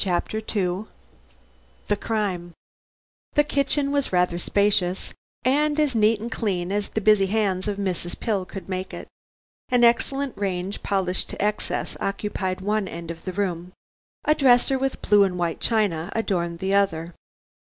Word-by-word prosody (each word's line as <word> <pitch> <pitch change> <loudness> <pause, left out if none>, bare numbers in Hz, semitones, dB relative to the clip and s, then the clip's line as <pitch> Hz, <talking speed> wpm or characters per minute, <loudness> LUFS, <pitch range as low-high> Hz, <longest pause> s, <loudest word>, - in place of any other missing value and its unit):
CHAPTER 190 +3 -1
II 200 -2 -2 1.0
THE 205 - +2
CRIME 195 -6 -2 0.8
The 295 - +6
kitchen 280 0 +1
was 285 -1 0
rather 180 -1 +2
spacious, 195 -1 +1 0.3
and 295 +3 +2
as 295 -3 +2
neat 220 -1 +3
and 230 +2 -5
clean 185 -6 -1
as 205 0 -1
the 220 - -2
busy 210 -2 +5
hands 195 -2 0
of 205 -1 -1
Mrs. 180 -3 -3
Pill 210 -5 0
could 195 +1 -8
make 185 0 -4
it. - - -8 0.6
An 245 -1 +3
excellent 270 +3 +2
range 195 -1 -3
polished 190 -2 -1
to - - -7
excess 210 +1 -1
occupied 195 -2 -2
one 210 0 0
end 170 -1 -6
of 165 - -10
the 185 - -2
room; 180 -2 -2 0.5
a 305 - +5
dresser 265 -1 +4
with 270 0 -2
blue 205 -1 +5
and 185 -2 0
white 170 -2 -1
china 200 -6 +1
adorned 175 -6 -1
the 190 +1 0
other. 170 -4 +1
200 Hz, 155 wpm, -24 LUFS, 180-225 Hz, 1.0 s, The